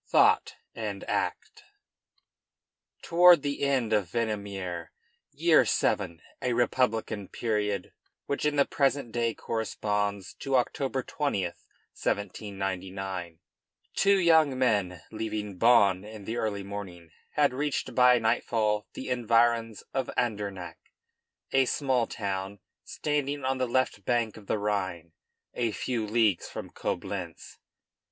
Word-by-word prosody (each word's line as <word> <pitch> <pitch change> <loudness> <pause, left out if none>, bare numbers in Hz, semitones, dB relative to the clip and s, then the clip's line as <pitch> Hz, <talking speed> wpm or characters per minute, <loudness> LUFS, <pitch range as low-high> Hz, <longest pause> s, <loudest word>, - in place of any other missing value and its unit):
THOUGHT - - +4 0.2
AND - - -4
ACT 435 -1 -3 1.4
Toward 175 -2 +6
the 140 -1 -2
end 130 -6 +1
of 100 -5 +1
Venemiaire, 100 -6 -3 0.4
year - - +5
VII., 85 -1 0 0.2
a 125 - 0
republican 115 -4 0
period 105 -4 -2 0.3
which 140 - -2
in 150 -1 +1
the 140 -1 +4
present 135 -3 0
day 115 -1 0
corresponds 105 -3 -2
to 135 -1 -1
October 130 +1 0
20, 140 -9 -1
1799, 95 -1 -4 0.5
two 200 0 +4
young 160 -6 +4
men, 100 -9 +1
leaving 110 -3 -4
Bonn 100 -5 +5
in 105 -1 -10
the 115 +3 -3
early 100 -3 -2
morning, 95 -4 -8 0.2
had 145 -3 +3
reached 145 +2 -2
by 125 -1 +6
nightfall 110 -2 +1
the - - -7
environs 115 -2 +2
of 135 -2 -1
Andernach, 100 -6 -2 0.7
a 135 0 +4
small 130 -4 +1
town 100 -1 -4 0.3
standing 145 -1 -2
on 130 0 0
the 130 - +1
left 120 -4 0
bank 115 -1 0
of 105 -3 -13
the - - +1
Rhine 95 -5 -2 0.4
a 120 -2 0
few 115 0 -2
leagues 110 -4 +2
from - - -7
Coblentz. - - -5
110 Hz, 120 wpm, -28 LUFS, 100-130 Hz, 1.4 s, Toward